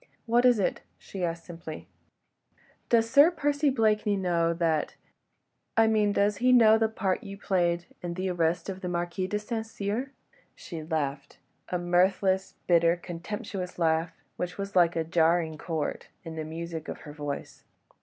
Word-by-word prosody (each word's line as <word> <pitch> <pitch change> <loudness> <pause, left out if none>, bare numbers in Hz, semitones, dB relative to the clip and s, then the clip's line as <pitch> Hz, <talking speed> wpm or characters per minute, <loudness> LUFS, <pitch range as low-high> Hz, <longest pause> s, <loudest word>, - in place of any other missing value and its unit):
"What 240 +1 +3
is 245 -2 +6
it?" 195 - 0 0.2
she 190 -2 -7
asked 165 -1 -3
simply. 165 -2 -8 1.0
"Does 225 -1 +4
Sir 285 +7 +7
Percy 290 -3 +1
Blakeney 215 -4 +2
know 170 -3 +1
that... 165 -2 0 0.8
I 225 - +6
mean, 215 -2 +3
does 205 +1 +2
he 250 +1 +3
know 220 -3 +7
the 225 -1 +2
part 200 -1 -1
you 200 -1 -8
played 175 -3 0 0.2
in 175 -1 -4
the 185 +1 -2
arrest 170 -1 0
of 190 -1 -5
the 180 - -3
Marquis 175 +2 -2
de 210 - -1
St. 220 +2 -3
Cyr?" 225 +3 -3 0.4
She 165 -3 -7
laughed—a 150 +2 -4
mirthless, 185 +2 +1
bitter, 170 -1 +4
contemptuous 180 +1 -6
laugh, 165 0 +1 0.3
which 180 0 -4
was 200 -1 -5
like 175 -2 +4
a 165 - +1
jarring 165 -1 +1
chord 160 -3 -3 0.2
in 165 -2 -7
the 155 -1 -4
music 165 0 -6
of - - -6
her 150 - -10
voice. 145 -2 -6
180 Hz, 160 wpm, -28 LUFS, 165-210 Hz, 1.0 s, Sir